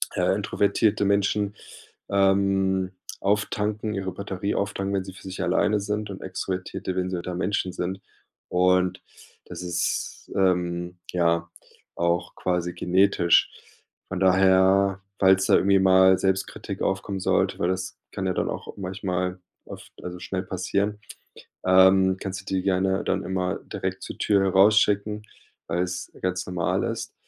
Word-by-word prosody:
äh, -, -, +2 dB
introvertierte 100 Hz, 0 st, +1 dB
Menschen, 100 Hz, +1 st, +1 dB, 0.5 s
ähm, 95 Hz, -1 st, +2 dB, 0.3 s
auftanken 105 Hz, +1 st, -1 dB
ihre 95 Hz, -1 st, -3 dB
Batterie 100 Hz, +1 st, -3 dB
auftanken, 100 Hz, 0 st, -2 dB
wenn 95 Hz, -, 0 dB
sie 95 Hz, -, -9 dB
für 95 Hz, -, -14 dB
sich 95 Hz, -1 st, -6 dB
alleine 105 Hz, 0 st, +2 dB
sind 105 Hz, +1 st, -3 dB
und 95 Hz, -, -7 dB
extrovertierte, 95 Hz, 0 st, -4 dB
wenn 90 Hz, 0 st, -1 dB
sie 90 Hz, -, -2 dB
unter 90 Hz, +1 st, -5 dB
Menschen 90 Hz, 0 st, -1 dB
sind. 95 Hz, +2 st, -4 dB, 0.5 s
Und 90 Hz, 0 st, +2 dB, 0.4 s
das -, -, -8 dB
ist, 85 Hz, -1 st, -3 dB
ähm, 90 Hz, -2 st, 0 dB
ja 85 Hz, -1 st, +1 dB, 0.5 s
auch 85 Hz, 0 st, -1 dB
quasi 90 Hz, -1 st, -1 dB
genetisch. 90 Hz, -1 st, +3 dB, 0.6 s
Von 95 Hz, -, -4 dB
daher, 95 Hz, +1 st, +4 dB, 0.2 s
falls 95 Hz, 0 st, +5 dB
da -, -, +5 dB
irgendwie 100 Hz, 0 st, +4 dB
mal 95 Hz, 0 st, +6 dB
Selbstkritik 95 Hz, 0 st, -2 dB
aufkommen 95 Hz, 0 st, -1 dB
sollte, 95 Hz, -, +1 dB
weil 85 Hz, -, +1 dB
das 95 Hz, 0 st, -3 dB, 0.2 s
kann 95 Hz, -, -3 dB
ja 95 Hz, -, 0 dB
dann -, -, -1 dB
auch -, -, -6 dB
manchmal 90 Hz, -1 st, -3 dB, 0.3 s
oft -, -, -11 dB
also, 90 Hz, 0 st, -6 dB
schnell 95 Hz, +1 st, -4 dB
passieren, 100 Hz, +3 st, -2 dB, 0.7 s
ähm, 95 Hz, 0 st, +5 dB
kannst 95 Hz, -1 st, -5 dB
du 95 Hz, -, -25 dB
die 95 Hz, -1 st, -1 dB
gerne 95 Hz, 0 st, +1 dB
dann 95 Hz, 0 st, -1 dB
immer 90 Hz, +1 st, -2 dB
direkt 95 Hz, 0 st, -4 dB
zur -, -, -7 dB
Tür 100 Hz, -2 st, +2 dB
rausschicken, 105 Hz, +1 st, +3 dB, 0.4 s
weil's 90 Hz, +1 st, -2 dB
ganz 90 Hz, -1 st, -1 dB
normal 90 Hz, -2 st, -1 dB
ist. -, -, -4 dB
95 Hz, 140 wpm, -25 LUFS, 90-100 Hz, 0.7 s, mal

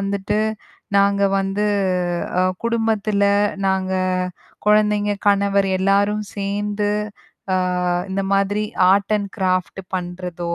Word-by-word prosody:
வந்துட்டு, 200 Hz, +1 st, -1 dB, 0.6 s
நாங்க 200 Hz, 0 st, +3 dB, 0.2 s
வந்து 195 Hz, +2 st, -1 dB, 0.8 s
அ -, -, +3 dB, 0.2 s
குடும்பத்தில 220 Hz, -3 st, 0 dB, 0.4 s
நாங்க 190 Hz, 0 st, 0 dB, 0.7 s
கொழந்தைங்க, 210 Hz, -1 st, +3 dB
கணவர் 200 Hz, -1 st, +3 dB
எல்லோரும் 200 Hz, +2 st, +2 dB
சேந்து, 205 Hz, +1 st, -2 dB, 0.6 s
அ -, -, +3 dB, 0.5 s
இந்த 195 Hz, +1 st, -1 dB
மாதிரி 200 Hz, +2 st, +1 dB, 0.3 s
ஆர்ட் 200 Hz, +1 st, +1 dB
அண்ட் 200 Hz, -1 st, -5 dB
கிராஃப்ட் 185 Hz, 0 st, 0 dB, 0.2 s
பண்றதோ, 175 Hz, -1 st, -4 dB
200 Hz, 95 wpm, -20 LUFS, 195-210 Hz, 0.8 s, நாங்க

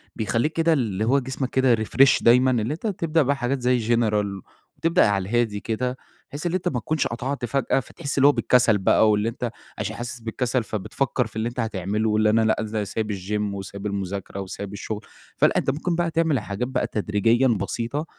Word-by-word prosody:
بيخليك 115 Hz, +7 st, 0 dB
كده 165 Hz, 0 st, +2 dB
اللي 110 Hz, -7 st, -1 dB
هو 135 Hz, +4 st, +3 dB
جسمك 130 Hz, 0 st, -4 dB
كده 130 Hz, -2 st, +3 dB
refresh 130 Hz, +5 st, +3 dB
دايمًا، 125 Hz, +2 st, +5 dB
اللي 120 Hz, +2 st, 0 dB
أنت 170 Hz, +8 st, -4 dB
تبدأ 165 Hz, -5 st, +1 dB
بقى 140 Hz, 0 st, +2 dB
حاجات 135 Hz, 0 st, -2 dB
زي 125 Hz, 0 st, +2 dB, 0.2 s
General، 105 Hz, -3 st, +1 dB, 0.5 s
وتبدأ 165 Hz, -6 st, +3 dB
على 100 Hz, -2 st, -1 dB
الهادي 115 Hz, -3 st, +1 dB
كده، 125 Hz, +4 st, -2 dB, 0.3 s
بحيث 145 Hz, +4 st, -7 dB
إن 175 Hz, -, 0 dB
أنت 185 Hz, -1 st, -1 dB
ما 125 Hz, -, 0 dB
تكونش 155 Hz, +6 st, -1 dB
قطعت 125 Hz, +3 st, -3 dB
فجأة، 135 Hz, +2 st, +1 dB
فتحس 140 Hz, +2 st, -6 dB
اللي 140 Hz, +1 st, +6 dB
هو 145 Hz, -, +7 dB
بالكسل 125 Hz, -6 st, +3 dB
بقى، 100 Hz, +2 st, +4 dB
واللي 105 Hz, +2 st, +1 dB
أنت 120 Hz, 0 st, -4 dB, 0.3 s
عشان 110 Hz, +1 st, -3 dB
حاسس 120 Hz, +1 st, -6 dB
بالكسل، 120 Hz, +2 st, -1 dB
فبتفكر 110 Hz, +4 st, -2 dB
في 105 Hz, -, -19 dB
اللي 110 Hz, +2 st, -1 dB
أنت 125 Hz, -, -8 dB
هتعمله، 105 Hz, -1 st, -1 dB
واللي 105 Hz, 0 st, +3 dB
أنا 110 Hz, +1 st, +3 dB
لأ 110 Hz, 0 st, +2 dB
إزاي 110 Hz, -1 st, -2 dB
سايب 110 Hz, +1 st, -3 dB
الGym، 100 Hz, +2 st, -2 dB
وسايب 100 Hz, +1 st, -7 dB
المذاكرة، 100 Hz, -1 st, -4 dB
وسايب 100 Hz, +1 st, -7 dB
الشغل. 105 Hz, +1 st, -5 dB, 0.4 s
فلأ، -, -, +3 dB
أنت -, -, +1 dB
ممكن 160 Hz, +5 st, -1 dB
بقى 170 Hz, -1 st, 0 dB
تعمل 160 Hz, -4 st, +2 dB
الحاجات 105 Hz, +4 st, -3 dB
بقى 130 Hz, -1 st, -1 dB
تدريجيًا 110 Hz, +4 st, +2 dB
بسيطة، 120 Hz, +7 st, -2 dB
115 Hz, 200 wpm, -24 LUFS, 105-135 Hz, 0.5 s, هو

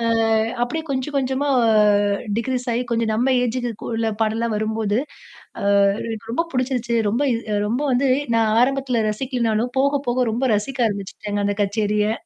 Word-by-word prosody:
ஆ -, -, -3 dB, 0.6 s
அப்பிடியே 315 Hz, +7 st, -3 dB
கொஞ்சம், 270 Hz, +2 st, -3 dB
கொஞ்சமா 265 Hz, +2 st, 0 dB, 0.9 s
டிக்ரீஸ் 250 Hz, +1 st, -2 dB
ஆகி 240 Hz, +2 st, 0 dB
கொஞ்சம் 225 Hz, -1 st, 0 dB
நம்ம 255 Hz, +4 st, +2 dB
ஏஜுக்கு 245 Hz, -2 st, -3 dB
உள்ள 225 Hz, 0 st, 0 dB
பாடல்லாம் 225 Hz, +1 st, -1 dB
வரும்போது, 215 Hz, -1 st, -1 dB, 0.6 s
அ -, -, -4 dB, 0.4 s
எனக்கு 225 Hz, 0 st, -6 dB
ரொம்ப 335 Hz, +7 st, 0 dB
பிடிச்சிருச்சு. 250 Hz, -2 st, -1 dB
ரொம்ப 235 Hz, +6 st, 0 dB
இது 230 Hz, -, -3 dB
அ -, -, +1 dB
ரொம்ப 245 Hz, +6 st, -1 dB
வந்து 260 Hz, +2 st, +2 dB, 0.3 s
நான் 220 Hz, -1 st, +2 dB
ஆரம்பத்தில 255 Hz, -3 st, +1 dB
ரசிக்கலனாலும், 240 Hz, -1 st, -1 dB
போக, 280 Hz, +1 st, +2 dB
போக 250 Hz, +1 st, +1 dB
ரொம்ப 245 Hz, +4 st, -1 dB
ரசிக்க 250 Hz, +5 st, -3 dB
ஆரம்பிச்சுட்டேங்க 205 Hz, +1 st, -4 dB
அந்த 205 Hz, 0 st, 0 dB
கச்சேரிய! 210 Hz, +1 st, 0 dB
235 Hz, 150 wpm, -21 LUFS, 220-260 Hz, 0.9 s, நம்ம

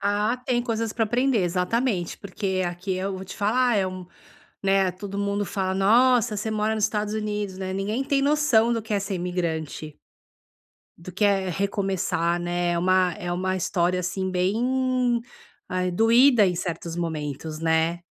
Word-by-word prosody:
Ah, 210 Hz, +4 st, +1 dB
tem 250 Hz, -1 st, -1 dB
coisas 230 Hz, -2 st, -2 dB
pra 225 Hz, -, +1 dB
aprender, 245 Hz, +3 st, +1 dB
exatamente, 180 Hz, +2 st, 0 dB
porque 190 Hz, -1 st, -2 dB
aqui 175 Hz, +2 st, -3 dB
eu 190 Hz, +1 st, -2 dB
vou 190 Hz, -, -7 dB
te 190 Hz, -, -9 dB
falar, 240 Hz, +3 st, +2 dB
é 195 Hz, -2 st, +2 dB
um 185 Hz, -1 st, -7 dB, 0.6 s
né 195 Hz, -1 st, +3 dB
todo 200 Hz, +2 st, -7 dB
mundo 200 Hz, 0 st, -1 dB
fala: 190 Hz, 0 st, -2 dB
"Nossa, 230 Hz, +3 st, +4 dB
você 215 Hz, +2 st, -3 dB
mora 215 Hz, 0 st, 0 dB
nos 215 Hz, -1 st, 0 dB
Estados 210 Hz, 0 st, -1 dB
Unidos, 210 Hz, -3 st, -3 dB
né." 190 Hz, -1 st, -4 dB
Ninguém 210 Hz, +7 st, -2 dB
tem 275 Hz, 0 st, +1 dB
noção 280 Hz, -6 st, +3 dB
do 230 Hz, -, -1 dB
que 215 Hz, 0 st, -3 dB
é 200 Hz, -, +1 dB
ser 195 Hz, 0 st, -3 dB
imigrante 165 Hz, -4 st, -3 dB, 1.0 s
do 180 Hz, +2 st, -9 dB
que 205 Hz, +4 st, 0 dB
é 195 Hz, -2 st, +2 dB
recomeçar, 185 Hz, -3 st, -1 dB
né. 175 Hz, 0 st, -1 dB
É 170 Hz, -, 0 dB
uma 185 Hz, 0 st, +3 dB
é 175 Hz, -, -4 dB
uma 185 Hz, +1 st, -1 dB
história 180 Hz, 0 st, 0 dB
assim 185 Hz, +1 st, -2 dB
bem, 245 Hz, +6 st, +1 dB, 0.5 s
ai, 185 Hz, 0 st, -1 dB
doída 230 Hz, +4 st, +5 dB
em 180 Hz, -, -1 dB
certos 170 Hz, -1 st, -4 dB
momentos, 155 Hz, -2 st, -4 dB
né. 165 Hz, +1 st, +1 dB
195 Hz, 170 wpm, -25 LUFS, 180-220 Hz, 1.0 s, doída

